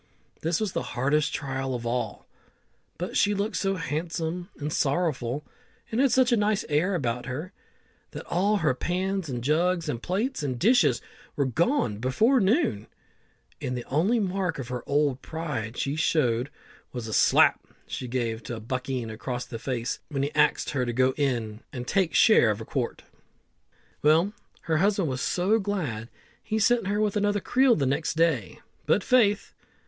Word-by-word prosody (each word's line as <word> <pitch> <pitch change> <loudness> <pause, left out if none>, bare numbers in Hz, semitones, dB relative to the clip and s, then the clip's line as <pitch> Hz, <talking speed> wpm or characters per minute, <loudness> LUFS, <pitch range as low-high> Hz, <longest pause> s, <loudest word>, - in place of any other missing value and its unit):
This 165 +1 0
was 215 -3 -1
the - - -2 0.2
hardest 145 +3 +2
trial 135 -2 -3
of 120 -1 -5
all, 120 -3 -2 0.7
but 180 +2 -4
she 205 0 +3
looked 205 +1 -2
so 195 +3 0
handsome 165 +2 -3
and 150 +1 -4
sorrowful, 140 -3 0 0.5
and 230 +3 +1
had 275 -2 +4
such 260 -1 +4
a - - +5
nice 210 -1 +1
air 170 +6 +2
about 125 -6 -2
her, 150 +9 -5 0.6
that - - -8
all 200 +5 +1
her 155 -8 +2
pans, 185 +4 -2
and 120 -2 -4
jugs, 170 +4 +1
and 125 -5 -3
plates, 210 - -1
and 130 -4 -2
dishes 240 - +3 0.3
were 140 - +1
gone 130 - +1
before 215 - +3
noon, 190 - +1 0.7
and 125 0 -2
the 120 - -6
only 190 - +2
mark 190 -3 -1
of 130 -3 -6
her 125 -1 -3
old 140 -2 +1
pride 140 -9 -4
she 140 +1 -1
showed 135 -6 +1 0.4
was 120 -3 -5
a 110 - -5
slap - - +4 0.2
she 125 - -5
gave 115 -2 -3
a 115 -2 -4
buckeen 125 0 -3
across 125 +3 -4
the 120 -2 -7
face 120 -1 -3
when 140 -2 -1
he 145 - -2
axed 150 0 +2
her 130 -3 0
to 120 -1 -2
go 130 +2 +3
in 120 -7 -1
an' 125 -4 -5
take 185 +5 +1
share 215 - +6
of 105 0 -1
a 110 - -7
quart. 125 -2 -3 1.0
Well, 165 +7 +4 0.3
her 160 -1 0
husband 195 -2 +2
was 130 0 -3
so 195 +5 +2
glad, 155 - -3 0.3
he 220 - -2
sent 230 -1 +3
her 205 +1 0
with 215 -1 +1
another 205 0 +1
creel 255 +4 +3
the 140 - 0
next 140 +5 0
day; 165 +1 0 0.3
but - - +3
faith! 215 -6 +3
150 Hz, 175 wpm, -26 LUFS, 125-195 Hz, 1.0 s, share